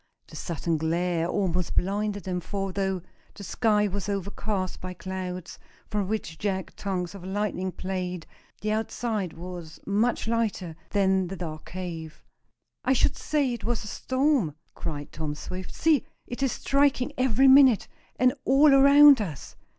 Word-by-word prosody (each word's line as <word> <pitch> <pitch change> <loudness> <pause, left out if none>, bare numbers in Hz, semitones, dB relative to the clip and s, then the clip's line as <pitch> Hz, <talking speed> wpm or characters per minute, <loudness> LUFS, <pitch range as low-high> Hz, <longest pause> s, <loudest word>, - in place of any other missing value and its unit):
The - - -12
sudden 165 -1 -2
glare 165 +1 0
almost 180 -2 -1
blinded 205 +1 0
them, 180 0 -2
for, 195 +2 -3
though 190 -2 -1 0.3
the 200 - -9
sky 210 0 +2
was 200 +1 -4
overcast 200 -1 -3
by 185 0 -6
clouds, 185 -2 -6 0.3
from 205 -2 0
which 205 -6 -3
jagged 190 -2 -2
tongues 185 -3 -3
of 195 -3 -10
lightning 190 -1 -2
played, 180 -2 -4 0.4
the 215 - -1
outside 215 -4 -2
was 170 -2 -8
much 220 +4 +1
lighter 220 -7 -1
than 190 -2 +2
the 190 - -5
dark 155 -3 -6
cave. 170 -4 -7 0.6
"I 260 - +3
should 260 - +2
say 285 -5 0
it 235 - -6
was 235 -1 -1
a - - -8
storm!" 260 - +1 0.2
cried 145 -3 -5
Tom 150 -1 -4
Swift. 185 +4 -7
"See, 315 -5 +3 0.2
it 245 - -7
is 270 -3 +2
striking 280 0 +1
every 260 0 +3
minute, 265 -4 +7 0.3
and 255 0 +4
all 275 +2 +6
around 280 -1 +8
us!" 160 -9 -6
195 Hz, 150 wpm, -27 LUFS, 180-230 Hz, 0.6 s, around